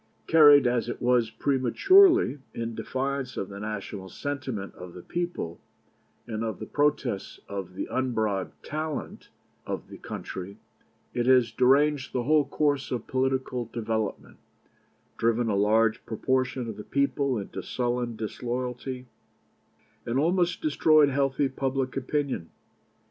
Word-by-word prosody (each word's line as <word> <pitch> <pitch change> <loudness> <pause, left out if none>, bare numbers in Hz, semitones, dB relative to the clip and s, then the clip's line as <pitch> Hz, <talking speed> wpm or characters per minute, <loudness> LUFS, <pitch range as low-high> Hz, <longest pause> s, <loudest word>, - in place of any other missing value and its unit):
Carried 145 -4 +7
as 120 -1 +1
it - - -4
was 125 -2 +2
prematurely, 150 - +4 0.2
in 115 0 -3
defiance 135 +2 -3
of 95 - -3
the 100 0 -8
national 100 -2 -5
sentiment 135 -8 -4
of 90 -1 -10
the 90 - -9
people 170 - -4 0.6
and 110 -1 -4
of 110 -1 -3
the - - -6
protests 140 -8 -1
of 95 -2 -6
the - - -3
unbribed 110 -7 -1
talent 155 0 -5 0.3
of - - -5
the - - -10
country, 95 +2 -7 0.6
it 120 0 0
has 125 -2 +5
deranged 140 +2 +3
the 125 - 0
whole 150 +2 +3
course 145 -1 0
of 120 -3 -3
political 130 -1 -1
development, 110 -2 -3 0.8
driven 115 0 +1
a 105 - +1
large 105 +2 +3
proportion 130 +1 -1
of 110 - -6
the 105 - -7
people 140 -1 0
into 100 - -5
sullen 120 -1 -2
disloyalty, 125 +3 -4 1.0
and 120 +2 -2
almost 175 +3 +1
destroyed 155 -1 +5
healthy 135 0 +1
public 135 -1 -2
opinion. 135 - -2
125 Hz, 130 wpm, -27 LUFS, 110-140 Hz, 1.0 s, Carried